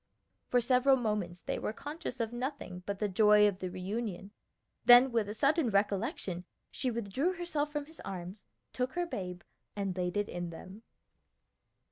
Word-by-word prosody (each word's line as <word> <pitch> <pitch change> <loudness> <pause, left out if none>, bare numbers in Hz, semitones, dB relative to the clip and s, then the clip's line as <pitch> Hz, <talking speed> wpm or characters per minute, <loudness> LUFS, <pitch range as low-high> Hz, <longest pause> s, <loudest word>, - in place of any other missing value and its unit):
For 245 - +4
several 255 +3 +4
moments 210 -8 -2
they - - -3
were - - -2
conscious 290 -2 -6
of 230 0 -2
nothing 240 -8 -4
but 200 -1 -2
the 210 - 0
joy 210 +1 +6
of 195 -2 -2
the 185 - -3
reunion; 195 +1 -4 0.5
then 245 +2 +8
with 225 -3 +1
a 210 - -5
sudden 280 +2 +3
recollection 200 -3 0 0.3
she 260 - -1
withdrew 235 - -1
herself 315 -4 -2
from 295 -1 -3
his 320 +2 -17
arms, 185 +1 -7 0.3
took 255 0 -1
her 350 0 0
babe, 180 - -5 0.3
and 195 -3 -2
laid 180 +1 -1
it 205 0 +1
in 175 -1 -4
them. 185 +5 -10
210 Hz, 165 wpm, -32 LUFS, 190-260 Hz, 0.5 s, then